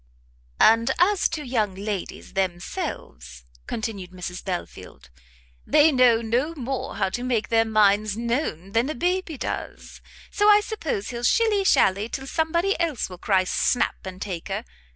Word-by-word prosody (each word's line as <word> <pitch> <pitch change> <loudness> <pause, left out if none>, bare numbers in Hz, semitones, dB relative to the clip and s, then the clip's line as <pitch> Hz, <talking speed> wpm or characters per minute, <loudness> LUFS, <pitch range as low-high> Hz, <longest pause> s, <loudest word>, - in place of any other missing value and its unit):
"And 230 +2 +5
as 375 +2 +3
to 305 -2 -5
young 220 -6 -1
ladies 200 -1 -5
themselves," 65 - -4 0.2
continued 215 -5 -4
Mrs 180 0 -7
Belfield, 180 - -7 0.5
"they 305 +1 +5
know 245 -4 +4
no 250 +9 0
more 270 -2 -4
how - - 0
to 245 - -4
make 245 -3 -1
their 225 0 +3
minds 215 -1 +2
known 230 - -2
than 230 +6 +1
a 310 - -3
baby 355 +1 -1
does: - - -6 0.3
so 415 0 +3
I 415 0 +8
suppose 340 - -4
he'll 235 -1 -5
shilly 420 - +2
shally 205 - +3
till 270 +1 -5
somebody 340 +6 0
else 310 - -1
will 180 - -9
cry 190 -2 +2
snap, 240 +6 0
and 185 -1 -8
take 185 -5 -5
her. - - -4
230 Hz, 150 wpm, -24 LUFS, 195-305 Hz, 0.5 s, I